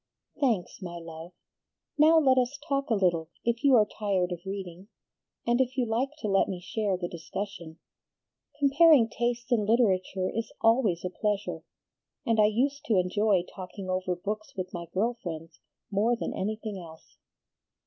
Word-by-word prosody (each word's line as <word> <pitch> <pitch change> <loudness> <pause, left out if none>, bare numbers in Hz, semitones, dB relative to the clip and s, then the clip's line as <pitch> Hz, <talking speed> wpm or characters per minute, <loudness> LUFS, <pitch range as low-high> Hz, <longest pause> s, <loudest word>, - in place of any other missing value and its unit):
"Thanks, 230 -10 0
my 175 -2 -6
love. 165 +1 -9 0.6
Now 315 +2 +6
let 265 -4 +5
us 255 +3 -1
talk 275 -2 -1
a 225 - +3
little, 170 -5 +1 0.2
if 235 +2 0
you 275 -2 +6
are 215 -3 +6
tired 195 -4 -1
of 175 -1 -4
reading, 190 -1 -6 0.6
and 240 +2 +3
if 260 +1 -1
you 250 - +2
like 235 +4 0
to 215 - -2
let 195 -1 +3
me 185 -2 -4
share 195 +1 -1
the 175 -1 -3
discussion. 170 -1 -6 0.8
Comparing 285 -2 +6
tastes 240 +2 -2
in 230 -3 +3
literature 190 -5 +2
is 225 +3 -3
always 225 -7 +2
a 180 - -2
pleasure, 210 +1 -2 0.6
and 230 -3 +2
I 210 - +7
used 275 +7 0
to 220 - +2
enjoy 190 +1 +2
talking 185 0 -6
over 185 -1 -1
books 210 +4 -5
with 185 -1 -4
my 170 -1 -5
girl 230 +5 0
friends 165 -1 -7 0.3
more 215 +4 +2
than - - -4
anything 215 0 -3
else." 160 -2 -13
210 Hz, 165 wpm, -28 LUFS, 180-240 Hz, 0.8 s, I